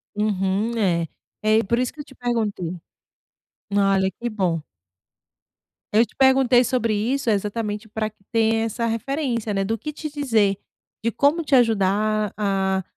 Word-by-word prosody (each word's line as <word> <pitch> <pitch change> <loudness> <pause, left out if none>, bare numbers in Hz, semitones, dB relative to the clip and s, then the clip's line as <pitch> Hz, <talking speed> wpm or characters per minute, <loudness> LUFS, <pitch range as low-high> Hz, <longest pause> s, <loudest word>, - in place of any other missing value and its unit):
Uhum, 210 +2 0
é. 170 -6 +1 0.3
É 215 +1 +3
por 235 +4 0
isso 250 -1 0
que 305 - -20
eu - - -4
te 280 - -17
perguntei. 210 -8 -2 0.9
Olha 195 -1 +3
que 240 - -1
bom. 185 -7 -1 1.3
Eu 225 +3 +5
te - - -25
perguntei 265 -2 +5
sobre 235 -2 0
isso, 235 +5 0
exatamente, 210 +1 -2
pra 215 0 -3
que 215 -2 -31
tenha 225 0 +2
essa 230 +1 -2
referência, 230 -1 -2
né, 195 0 0
do 225 +3 -1
que 300 - -5
te 305 +1 -5
dizer, 225 -9 +1 0.5
de 230 - +1
como 290 +8 +2
te 285 -3 +2
ajudar 215 -2 +2
a 195 -2 0
220 Hz, 155 wpm, -23 LUFS, 200-240 Hz, 1.3 s, Eu